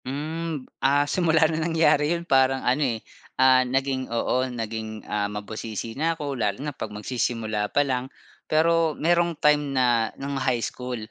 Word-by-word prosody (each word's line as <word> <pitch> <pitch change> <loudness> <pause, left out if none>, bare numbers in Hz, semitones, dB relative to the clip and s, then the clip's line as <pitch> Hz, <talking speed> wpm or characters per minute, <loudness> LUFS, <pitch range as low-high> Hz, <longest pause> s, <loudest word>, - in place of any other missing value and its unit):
Hmm, 155 +2 -4 0.2
ah, 145 +2 +3
simula 160 0 +3
ng 160 0 0
nangyari 160 -3 +3
yun 170 - -8
parang 135 -2 +3
ano 130 +4 +2 0.2
eh, - - -18 0.3
ah, 130 0 +6
naging 130 +1 -1
oo, 120 +2 0
naging 110 -2 -5
ah, 105 -1 -1
mabusisi 110 +2 -6
na 160 +5 -1
ako, 145 -3 -3
lalo 100 -2 0
na 145 +2 -5
pag 110 -4 -6
magsisimula 110 -1 -2
pa 145 - +2
lang. 130 -1 -2 0.4
Pero 165 0 +2
merong 170 0 +2
time 150 -2 +2
na 120 -3 +3
ng 140 0 -4
high 130 -3 +1
school 125 -1 -5
135 Hz, 160 wpm, -25 LUFS, 115-150 Hz, 0.4 s, ah